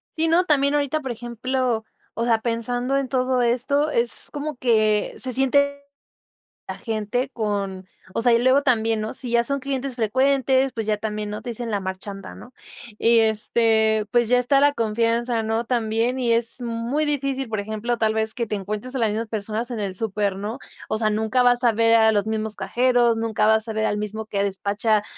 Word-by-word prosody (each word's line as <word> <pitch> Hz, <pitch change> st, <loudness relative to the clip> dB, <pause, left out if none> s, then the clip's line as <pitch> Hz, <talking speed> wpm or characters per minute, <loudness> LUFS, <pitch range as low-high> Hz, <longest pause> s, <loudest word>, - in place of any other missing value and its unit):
Sí, 325 Hz, 0 st, +1 dB
no, 335 Hz, +3 st, +4 dB
también 285 Hz, -4 st, +2 dB
ahorita, 290 Hz, +1 st, 0 dB
por 265 Hz, -3 st, -4 dB
ejemplo, 240 Hz, 0 st, -2 dB, 0.3 s
o 230 Hz, -, -2 dB
sea, 230 Hz, -2 st, +3 dB
pensando 245 Hz, +3 st, -1 dB
en 275 Hz, -1 st, -1 dB
todo 255 Hz, -1 st, +1 dB
esto, 265 Hz, +5 st, +1 dB
es 235 Hz, 0 st, -1 dB
como 295 Hz, -1 st, -5 dB
que 215 Hz, -4 st, +2 dB
se 255 Hz, -1 st, -4 dB
siente 280 Hz, +2 st, +2 dB, 0.9 s
la -, -, -5 dB
gente 225 Hz, +3 st, -2 dB
con 200 Hz, -4 st, -3 dB, 0.3 s
o 230 Hz, -, -1 dB
sea, 240 Hz, 0 st, +4 dB
y 230 Hz, -, +5 dB
luego 260 Hz, +3 st, +4 dB
también, 225 Hz, -4 st, +1 dB
¿no? 215 Hz, +3 st, -4 dB
Si 250 Hz, -2 st, -5 dB
ya 235 Hz, 0 st, +4 dB
son 280 Hz, +3 st, -1 dB
clientes 270 Hz, -1 st, -4 dB
frecuentes, 265 Hz, +3 st, +2 dB
pues 225 Hz, -2 st, -4 dB
ya 215 Hz, -1 st, +1 dB
también, 210 Hz, 0 st, -4 dB
¿no?, 210 Hz, -, -6 dB
te 245 Hz, -, -5 dB
dicen 235 Hz, 0 st, -5 dB
la 205 Hz, -, 0 dB
marchanta, 190 Hz, +1 st, -7 dB
¿no? 245 Hz, -, -13 dB, 0.5 s
Y, 230 Hz, 0 st, +5 dB
este, 220 Hz, 0 st, +2 dB
pues 240 Hz, -2 st, +3 dB
ya 250 Hz, +1 st, +4 dB
está 260 Hz, +3 st, +3 dB
la 290 Hz, +1 st, +4 dB
confianza 230 Hz, +1 st, 0 dB
¿no? 225 Hz, +1 st, -1 dB
También 230 Hz, +1 st, 0 dB
y 240 Hz, -2 st, +2 dB
es 230 Hz, +2 st, -1 dB
muy 235 Hz, +5 st, -2 dB
difícil, 275 Hz, -3 st, -2 dB
por 215 Hz, -1 st, -3 dB
ejemplo, 220 Hz, +3 st, -3 dB
tal 220 Hz, -1 st, +1 dB
vez 220 Hz, 0 st, 0 dB
que 235 Hz, -, -2 dB
te 210 Hz, -, -2 dB
encuentres 210 Hz, +6 st, -5 dB
a -, -, -1 dB
las 225 Hz, -2 st, +2 dB
mismas 220 Hz, +2 st, -2 dB
personas 220 Hz, +2 st, -4 dB
en 230 Hz, -, -4 dB
el 195 Hz, -2 st, -3 dB
súper, 205 Hz, -2 st, -1 dB
¿no? 210 Hz, +4 st, -5 dB, 0.3 s
O 215 Hz, -, -1 dB
sea, 215 Hz, -1 st, +1 dB
nunca 220 Hz, +4 st, +1 dB
vas 245 Hz, 0 st, +3 dB
a 235 Hz, -, +5 dB
ver 230 Hz, +1 st, +3 dB
a 220 Hz, -1 st, +5 dB
los 205 Hz, -1 st, +1 dB
mismos 220 Hz, -1 st, -2 dB
cajeros, 240 Hz, +3 st, +2 dB
nunca 225 Hz, -2 st, 0 dB
vas 220 Hz, 0 st, +3 dB
a -, -, -2 dB
ver 220 Hz, 0 st, 0 dB
al 205 Hz, -, -1 dB
mismo 215 Hz, +1 st, -4 dB
que 200 Hz, -2 st, -1 dB
despacha 205 Hz, +2 st, 0 dB
230 Hz, 205 wpm, -23 LUFS, 215-255 Hz, 0.9 s, y